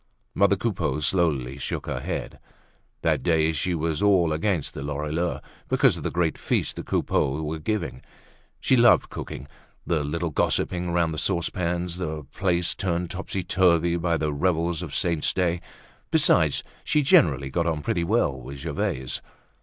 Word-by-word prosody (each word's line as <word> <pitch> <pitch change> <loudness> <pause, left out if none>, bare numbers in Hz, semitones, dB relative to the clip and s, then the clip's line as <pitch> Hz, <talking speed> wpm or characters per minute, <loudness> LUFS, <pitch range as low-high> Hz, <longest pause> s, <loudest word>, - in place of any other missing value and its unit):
Mother 100 0 +4
Coupeau 100 -6 -1
slowly 70 -4 0
shook - - -4
her - - -3
head. - - -5 0.6
That - - +2
day 80 -2 +2
she 85 +3 -1
was 80 -1 -1
all 95 -6 +4
against 80 -1 -1
the - - -6
Lorilleuxs, 75 +4 -2 0.3
because - - +4
of - - -7
the - - -1
great 85 -2 0
feast - - 0
the - - -5
Coupeaus 70 +4 0
were 80 +1 -3
giving. 90 - -3 0.6
She 130 - +3
loved 120 -1 +5
cooking, 70 - -7 0.4
the 80 -3 0
little 85 +3 -2
gossipings 85 +4 0
round 85 -2 +1
the 75 - -3
saucepans, 85 -1 -1
the 80 -4 -4
place 85 +4 0
turned 90 -2 -2
topsy 95 0 -4
turvy 85 -2 +3
by 85 -1 +1
the 75 -1 -1
revels 85 +1 0
of 85 -6 -6
saints' 85 -4 0
days. 90 -2 +1 0.5
Besides - - +3 0.2
she 150 - +2
generally 70 - +4
got 85 +2 0
on 80 -3 -1
pretty 85 +4 0
well 85 - +1
with 70 +3 -8
Gervaise. 65 -1 -3
85 Hz, 160 wpm, -25 LUFS, 75-90 Hz, 0.6 s, loved